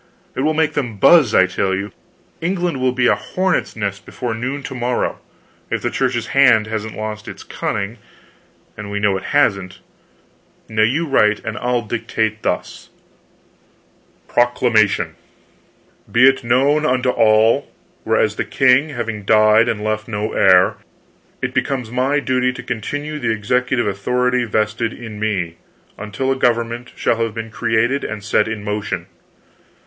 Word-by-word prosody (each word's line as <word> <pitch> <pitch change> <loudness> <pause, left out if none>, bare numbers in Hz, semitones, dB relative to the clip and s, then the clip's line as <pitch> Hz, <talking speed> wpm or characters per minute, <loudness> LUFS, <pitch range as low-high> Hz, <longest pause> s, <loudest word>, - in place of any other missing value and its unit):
"It - - -6
will 155 +2 +1
make 160 -1 +1
them 120 -7 -3
buzz, 145 - +5
I 95 - +6
tell 95 +1 -1
you! 100 +2 -4 0.5
England 175 -5 -1
will 130 0 +2
be 125 0 0
a - - +5
hornets' 185 0 -1
nest 100 -2 -4
before 120 -2 -5
noon 130 +5 -4
to 135 - -6
morrow, 125 -1 -2 0.5
if - - -2
the - - -1
Church's 125 -3 -1
hand 125 -6 +5
hasn't 110 0 -5
lost 110 0 -5
its - - -9
cunning 100 +3 -4 0.8
and 105 -1 -8
we 100 0 -3
know 100 -1 +2
it 95 - -5
hasn't. 100 -10 +1 0.9
Now 110 0 -1
you 135 +10 +2
write 105 -8 +2
and 110 - -4
I'll 120 +1 -1
dictate 110 -1 -2
thus: - - -4 1.4
"PROCLAMATION 110 -8 +2 0.9
"BE 125 +3 +6
IT 135 -1 -2
KNOWN 135 +6 +2
UNTO 125 -3 +1
ALL. 110 -1 +3 0.3
Whereas - - +1
the - - 0
king 130 +3 +3
having 115 -6 -4
died 110 +2 +4
and 105 -1 -2
left 110 +2 -2
no 105 -1 -3
heir, 90 -1 +4 0.7
it - - -2
becomes 125 -5 -2
my 130 +4 +1
duty 130 -2 0
to 130 -1 -8
continue 145 +7 -4
the 120 -5 -1
executive 120 +3 0
authority 125 +5 0
vested 110 +1 -1
in 110 -3 -9
me, 95 -6 -2 0.4
until 105 +6 -3
a - - +1
government 120 -1 -1
shall 115 - 0
have 115 -2 -2
been 115 -1 -6
created 120 +6 0
and 105 -2 -5
set 105 +2 +1
in 110 -2 -5
motion. 105 0 -3
115 Hz, 155 wpm, -19 LUFS, 105-130 Hz, 1.4 s, I